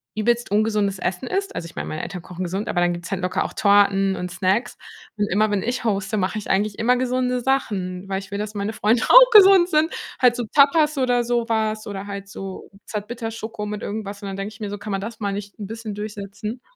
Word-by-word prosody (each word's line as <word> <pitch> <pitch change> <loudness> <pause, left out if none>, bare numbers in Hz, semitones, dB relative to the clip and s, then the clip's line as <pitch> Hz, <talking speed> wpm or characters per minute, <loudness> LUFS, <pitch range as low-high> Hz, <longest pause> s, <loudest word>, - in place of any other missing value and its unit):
übelst 235 0 0
ungesundes 210 -2 +1
Essen 185 +9 -3
isst. 395 +5 -2
Also 165 - -4
ich 165 - -11
mein, - - -4
meine 155 - -4
Eltern 180 - -6
kochen 180 +1 -7
gesund, 190 +5 -3
aber 175 - 0
dann 175 0 +2
gibt's 175 +1 -7
halt 190 -1 -2
locker 180 0 0
auch - - -6
Torten 200 -1 +3
und 180 - -4
Snacks. 190 +6 0 0.4
Und 205 - +1
immer, 215 +3 +2
wenn 200 -2 0
ich 245 +2 -2
hoste, 210 -1 -1
mache 190 +2 -1
ich 210 - -6
eigentlich 200 +1 0
immer 245 +3 +3
gesunde 250 0 0
Sachen, 195 -8 -1
weil 195 0 -2
ich 195 - -11
will, 200 - -3
dass 210 +1 -4
meine 205 +2 -2
Freunde 220 +3 +2
auch - - +9
gesund 385 -4 +8
sind. 315 0 +2 0.3
Halt 250 -2 +5
so 240 -2 -3
Tapas 300 +1 +4
oder 245 -2 +2
so 240 -1 0
was 220 -1 -1
oder 195 -1 -5
halt 200 -1 -6
so 195 -1 -8 0.2
Zartbitterschoko 225 0 -5
mit 210 0 -5
irgendwas 205 -1 -5
und 200 - -6
dann 195 0 -5
denke 200 +2 -5
ich 220 - -16
mir 210 - -3
so: 205 - -5
„Kann 210 +1 -7
man 195 0 -1
das 225 +2 -7
mal 200 -2 -2
nicht 200 0 -7
ein 205 - -5
bisschen 220 -2 -6
durchsetzen?“ 210 +2 -6
210 Hz, 235 wpm, -22 LUFS, 195-240 Hz, 0.4 s, auch